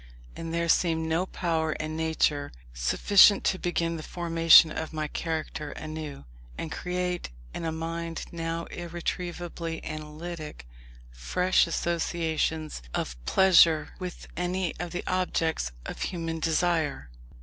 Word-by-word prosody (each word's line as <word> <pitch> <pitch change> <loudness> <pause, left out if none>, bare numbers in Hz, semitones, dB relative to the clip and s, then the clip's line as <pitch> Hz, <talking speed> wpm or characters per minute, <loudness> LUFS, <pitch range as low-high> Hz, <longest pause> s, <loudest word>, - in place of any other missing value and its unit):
And 165 0 -5
there 170 0 0
seemed 160 -1 +2
no 165 +4 0
power 160 -4 -1
in 155 0 -4
nature 155 -3 +1 0.2
sufficient 195 - +5
to 185 - +1
begin 170 -1 -1
the - - -6
formation 165 -1 +6
of 160 +1 -4
my 155 -1 -2
character 155 -2 -4
anew, 155 - -7 0.3
and 160 - -5
create, 180 - -2 0.2
in - - -4
a 160 - 0
mind 165 +1 -4
now 165 0 -3
irretrievably 175 -1 -4
analytic, 155 - -7 0.5
fresh 180 - +2
associations 160 - -1
of 65 - -2
pleasure 170 -5 +5
with 180 -2 -6
any 180 0 -1
of 175 +1 -3
the 175 +1 -4
objects 165 - 0
of - - -6
human 165 -2 -3
desire. 160 - 0
165 Hz, 125 wpm, -28 LUFS, 155-175 Hz, 0.5 s, formation